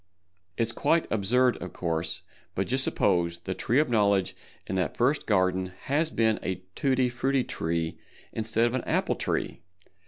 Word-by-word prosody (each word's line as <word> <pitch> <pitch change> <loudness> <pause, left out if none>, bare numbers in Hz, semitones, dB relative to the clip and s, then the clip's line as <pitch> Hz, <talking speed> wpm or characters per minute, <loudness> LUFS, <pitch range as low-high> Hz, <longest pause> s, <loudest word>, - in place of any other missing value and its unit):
_ - - -46 0.5
It's 115 0 +1
quite 165 +7 +2
absurd, 120 +5 +3
of 90 - -7
course, 80 -1 -2 0.3
but 95 - 0
just 130 +4 +1
suppose 85 -7 +1
the 95 +2 -4
Tree 120 +6 0
of 150 +1 +4
Knowledge 100 -5 +2 0.3
in - - -5
that 90 -5 -1
First 135 +5 +1
Garden 95 -2 +1
has 155 +4 +1
been 110 -6 +1
a 90 0 -3
Tutti 130 0 +2
Frutti 130 +2 0
Tree 80 -4 -2 0.3
instead 110 +1 +1
of 120 - 0
an 130 - -1
Apple - - +1
Tree! - - -2
110 Hz, 165 wpm, -27 LUFS, 90-125 Hz, 0.5 s, of